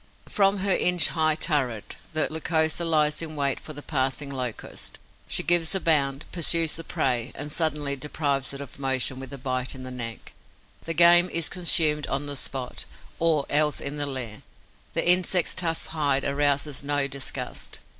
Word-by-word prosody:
From 200 0 +2
her 195 - +3
inch 180 -3 +3
high 155 -1 +1
turret, 135 - -2 0.2
the 155 - +1
Lycosa 160 +1 +1
lies 155 -2 +2
in 155 -1 -5
wait 140 -2 0
for 155 - -9
the 145 0 -8
passing 135 0 -2
Locust. 125 -4 -5 0.3
She - - +1
gives 175 0 +2
a - - +1
bound, 140 -5 +2
pursues 165 -2 +2
the 165 - -6
prey 125 -9 -1
and 145 +2 -5
suddenly 150 -3 0
deprives 140 -1 -2
it 140 0 -7
of 140 0 -10
motion 130 -1 0
with 135 -1 -9
a 140 - -6
bite 130 -1 -2
in 130 - -8
the 130 - -6
neck. 115 -2 -4 0.5
The 165 - -3
game 175 +1 +7
is 170 -3 0
consumed 160 -4 +2
on 140 +1 -2
the 145 0 -3
spot, 130 -2 -3 0.3
or 160 -4 +2
else 150 0 +2
in 140 +1 -4
the 145 0 -1
lair; 125 -6 -4 0.5
the - - +2
insect's 180 0 +4
tough 165 -3 -2
hide 145 -4 0
arouses 140 0 0
no 145 0 +1
disgust. 140 0 -5
145 Hz, 175 wpm, -26 LUFS, 135-165 Hz, 0.5 s, game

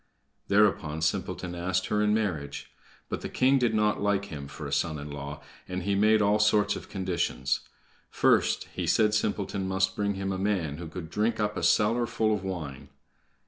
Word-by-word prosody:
Thereupon 95 -7 +2
Simpleton 90 +2 -2
asked 90 +2 -1
her 105 - 0
in 105 0 +3
marriage. 90 -10 -2 0.4
But - - -4
the - - -5
king 135 +1 +3
did 120 -3 +1
not 105 -1 +2
like 100 -1 +1
him 75 -7 -7
for 70 - -8
a - - -5
son 80 -1 0
in 75 0 -7
law, 70 +1 -7 0.2
and 90 0 -4
he 100 +2 0
made 105 +2 +4
all 105 +1 +3
sorts 105 -1 +3
of - - -9
conditions. 95 -9 -1 0.5
First, - - +2
he - - -3
said 105 -1 +3
Simpleton 100 -2 -1
must 95 0 +1
bring 100 -1 0
him 95 0 -2
a 95 - -3
man 95 -7 -1
who 85 0 -6
could 80 0 -8
drink 110 +2 0
up 105 0 0
a - - -3
cellar 115 +3 +3
full 110 -1 +1
of 100 -2 -2
wine. 80 -9 -5
100 Hz, 190 wpm, -28 LUFS, 85-105 Hz, 0.5 s, made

